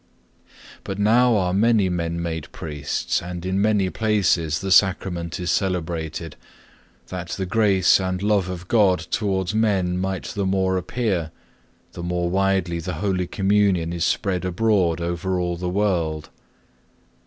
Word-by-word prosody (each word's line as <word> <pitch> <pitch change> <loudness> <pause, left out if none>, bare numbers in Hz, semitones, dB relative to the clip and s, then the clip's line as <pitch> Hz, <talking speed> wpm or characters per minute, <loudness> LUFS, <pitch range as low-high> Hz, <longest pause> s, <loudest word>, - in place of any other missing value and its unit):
But 95 - -5
now 115 +4 +4
are 90 -2 0
many 110 0 +3
men 85 -1 -2
made 80 -2 -4
priests 75 -2 -3
and 90 0 -6
in 95 +1 0
many 100 -3 +2
places 95 -8 +1
the 95 +3 -4
Sacrament 90 -3 +2
is 90 - -1
celebrated, 85 -4 -2 0.7
that 90 -2 -5
the 95 - -3
grace 95 -2 +3
and 95 -1 -2
love 100 -3 +1
of 90 0 -6
God 100 -5 +4
towards 95 -3 -1
men 95 -5 +1
might 95 0 -2
the 100 -2 -3
more 95 0 +1
appear, 95 -3 -1 0.6
the - - -8
more 85 0 -1
widely 95 -3 +1
the 90 +2 -4
Holy 90 0 -1
Communion 95 -4 +1
is 85 -2 -2
spread 95 -1 0
abroad 90 -3 +1
over 85 +2 -2
all 90 -1 -1
the 90 +1 -3
world. 85 -6 -1
95 Hz, 145 wpm, -22 LUFS, 85-100 Hz, 0.7 s, now